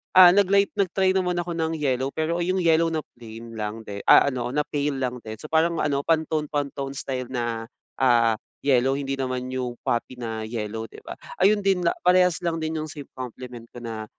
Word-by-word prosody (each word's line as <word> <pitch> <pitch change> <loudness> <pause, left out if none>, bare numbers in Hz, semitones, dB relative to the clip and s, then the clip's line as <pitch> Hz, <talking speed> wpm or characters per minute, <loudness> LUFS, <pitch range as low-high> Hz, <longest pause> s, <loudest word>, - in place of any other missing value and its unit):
ah, 185 -1 +10
nag-light 200 0 +4
nag-try 190 0 +2
naman 180 -1 0
ako 170 -1 -5
ng 160 0 0
yellow. 135 -1 0
Pero 170 +2 -1
yung 185 +1 0
yellow 165 0 +3
na 155 - 0 0.2
plain 115 0 -10
lang 105 +1 -4
di 100 0 -6
ah, 140 - +7
ano 125 -2 -3
na 150 - +2
pale 145 -1 -1
lang 125 -1 -1
din, 110 0 -6
so 155 - -8
parang 165 +1 +2
ano 140 -1 0
pantone 160 -1 +1
pantone 140 -2 -3
style 130 -2 -4
na 120 -2 -2 0.4
ah, 115 -3 +4 0.3
yellow. 135 -1 +3
Hindi 135 -1 -2
naman 130 -1 -2
yung 125 -2 -3
poppy 120 +1 -1
na 110 -2 -4
yellow 110 -1 -4
'di - - -12
ba? - - -6 0.3
Ayun 205 +2 +5
din 185 -3 +2 0.2
parehas 180 -1 +4
lang 165 -1 0
din 160 0 -2
yung 155 - -6
sa 145 - -8 0.2
compliment 125 -1 -8
ko 120 - -8
na 110 -2 -5
140 Hz, 200 wpm, -24 LUFS, 120-165 Hz, 0.4 s, ah